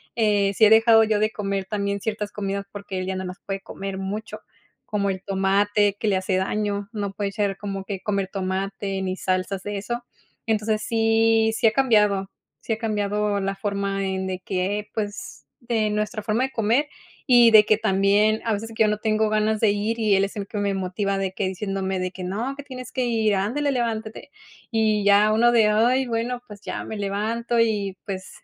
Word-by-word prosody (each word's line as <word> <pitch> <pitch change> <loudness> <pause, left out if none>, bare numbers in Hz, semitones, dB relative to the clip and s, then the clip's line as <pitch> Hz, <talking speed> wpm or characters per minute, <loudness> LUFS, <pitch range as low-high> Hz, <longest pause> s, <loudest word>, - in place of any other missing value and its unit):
eh, 205 -3 +2
si 220 - +1
he - - +6
dejado 225 0 +6
yo 215 -1 +1
de 215 +1 +1
comer 195 -2 -3
también 200 0 -2
ciertas 210 0 -3
comidas 200 -1 -4
porque 200 -2 -6
él 185 - -4
ya 190 - -2
no 185 - -4
las 180 +1 -7
puede 195 0 -4
comer 195 0 -6
mucho, 200 +3 -5 0.4
como 200 -2 -1
el 190 0 -4
tomate 200 +1 +2
que 220 - -1
le 195 -2 +3
hace 185 0 -1
daño. 205 +1 -1
No 200 -2 -3
puede 200 -1 -3
ser 200 -1 -1
como 195 -1 -5
que, 195 -1 -5
comer 200 -2 -1
tomate 195 0 -3
ni 185 -1 -2
salsas 185 +1 -2
de 205 -1 -4
eso. 240 +4 -4 0.4
Entonces 215 -1 0
sí, 225 0 +3
si - - 0
ha 220 - +6
cambiado, 210 -7 +2 0.3
si 225 - -2
ha - - -3
cambiado 210 -2 -1
la 195 0 -2
forma 200 -1 -2
en 190 0 -2
de 185 -1 -3
que 195 +3 -2
pues 205 -2 -5
de 225 -3 0
nuestra 210 +1 -2
forma 220 +4 0
de 265 - -2
comer 235 +6 +1 0.4
y 240 -3 +7
de 215 -1 +9
que 215 0 +3
también 210 +1 +2
a 225 - +1
veces 225 +2 -4
que 220 - +4
yo 215 - +3
no 210 - 0
tengo 215 0 +1
ganas 215 0 +1
de 215 -2 +4
ir 210 +3 -1
y 215 -3 +3
él 195 - +3
es 200 - -8
el 200 -2 -4
que 210 - -7
me 200 -1 0
motiva 195 +1 -2
de 190 -1 -1
que 190 0 -2
diciéndome 190 0 -3
de 185 0 -2
que: 185 - -8
"No, 220 +9 -3
que 285 - -6
tienes 255 -3 -9
que 255 - -1
ir. 220 -3 +1
Ándale, 260 +10 0
levántate" 230 +1 -3 0.4
y 215 -2 +2
ya 205 +1 +5
uno 235 +2 +4
de: 220 -3 +5
"Ay, 245 +5 +3
bueno, 240 +1 -2
pues 205 -2 -11
ya - - -5
me 220 - -6
levanto" 220 +4 -1
y 205 -4 +1
pues 190 -2 -5
210 Hz, 210 wpm, -23 LUFS, 195-220 Hz, 0.4 s, de